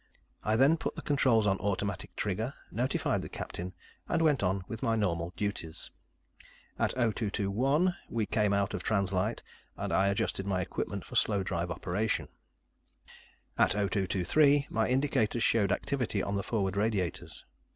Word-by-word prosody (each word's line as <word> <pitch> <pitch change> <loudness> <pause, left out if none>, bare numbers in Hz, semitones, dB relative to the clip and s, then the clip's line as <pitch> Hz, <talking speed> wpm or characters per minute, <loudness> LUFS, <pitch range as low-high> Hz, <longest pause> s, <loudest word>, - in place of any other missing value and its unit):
I 110 - +2
then 135 +7 +5
put - - -4
the - - -7
controls 130 -7 +3
on 95 -1 +2
automatic 100 -2 -2
trigger, 110 +4 -2 0.2
notified 125 +3 0
the - - -7
captain, 90 +1 -5 0.3
and - - +2
went 155 -4 +3
on 95 0 0
with 115 - -6
my 115 - +1
normal 85 -5 -1
duties. 100 -6 -3 0.9
At - - +1
0221, 120 - +1
we 115 -2 0
came 105 -1 +2
out 100 0 +1
of - - -3
trans 100 -3 0
light, 105 +5 -1 0.3
and - - -3
I 95 +1 +3
adjusted 100 0 0
my 95 -2 0
equipment 90 - -3
for - - -10
slow 100 -3 +2
drive 85 -2 -2
operation. 95 +5 -1 1.3
At - - +5
0223, 105 - +2
my 110 0 +1
indicators 125 -4 +1
showed 105 -3 +3
activity 125 -8 0
on 100 - -2
the 100 - 0
forward 100 -3 -1
radiators. 100 -4 -2
105 Hz, 150 wpm, -30 LUFS, 95-115 Hz, 1.3 s, then